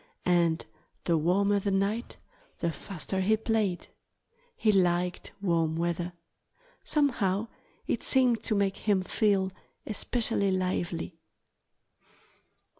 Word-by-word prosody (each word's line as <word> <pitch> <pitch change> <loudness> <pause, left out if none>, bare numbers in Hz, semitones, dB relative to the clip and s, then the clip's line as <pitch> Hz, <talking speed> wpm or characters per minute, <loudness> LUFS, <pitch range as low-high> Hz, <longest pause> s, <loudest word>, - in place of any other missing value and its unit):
And 170 -2 +2 0.4
the 170 - +2
warmer 200 +6 +2
the 200 - -1
night 200 +4 -1 0.4
the 170 - -1
faster 190 +2 -4
he 215 +3 +3
played. 215 -5 -1 0.7
He 220 - +3
liked 180 -2 +1
warm 165 -4 +1
weather. 170 +1 -1 0.7
Somehow 230 -8 +1 0.4
it - - -1
seemed 250 -4 +3
to 215 - +1
make 200 -1 +1
him 200 -3 +1
feel 195 -1 +1 0.3
especially 215 -1 +1
lively. 180 -3 -2
195 Hz, 105 wpm, -29 LUFS, 175-210 Hz, 0.7 s, he